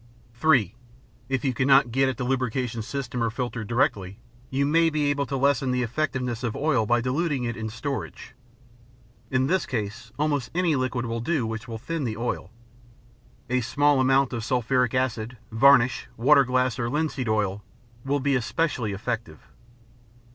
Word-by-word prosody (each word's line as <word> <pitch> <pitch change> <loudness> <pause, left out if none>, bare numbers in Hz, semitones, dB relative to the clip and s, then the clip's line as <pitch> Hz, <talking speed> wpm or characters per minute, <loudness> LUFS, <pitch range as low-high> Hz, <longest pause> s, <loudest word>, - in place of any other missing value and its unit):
(3) 115 - +3 0.6
If 135 0 -1
you 130 - +1
cannot 135 0 +4
get 135 +2 +2
at 130 - -4
the 130 - -3
lubrication 125 -2 -1
system 125 +1 -4
or 115 - +1
filter 120 -1 -4
directly, 100 -4 0 0.3
you 135 +1 0
may 165 +3 +3
be 150 -2 +1
able 145 -1 -1
to 135 - -2
lessen 135 -1 +2
the 125 0 +1
effectiveness 125 -2 -2
of 115 -3 -2
oil 135 -8 +1
by 120 +1 +3
diluting 140 +2 -1
it 115 -1 -2
in 110 0 -4
storage. 135 +5 -5 1.0
In 130 0 +1
this 185 +6 0
case, 110 -1 -4
almost 145 -3 0
any 175 -4 +2
liquid 130 -2 -1
will 115 0 -3
do 130 +1 0
which 110 +1 -5
will 115 -1 -5
thin 150 +7 -4
the 110 -4 -3
oil. 115 -5 -3 1.0
A 125 +1 +1
small 145 +4 +2
amount 135 0 +3
of 115 -2 -3
sulphuric 125 0 +1
acid, 125 -2 -1
varnish, 125 +1 +4
water 140 +4 +5
glass, 125 -1 0
or 120 -1 -1
linseed 145 -4 -1
oil 105 -2 0 0.4
will 140 +1 0
be 140 +1 +1
especially 125 -3 -1
effective. 110 -4 -5
125 Hz, 165 wpm, -25 LUFS, 115-140 Hz, 1.0 s, water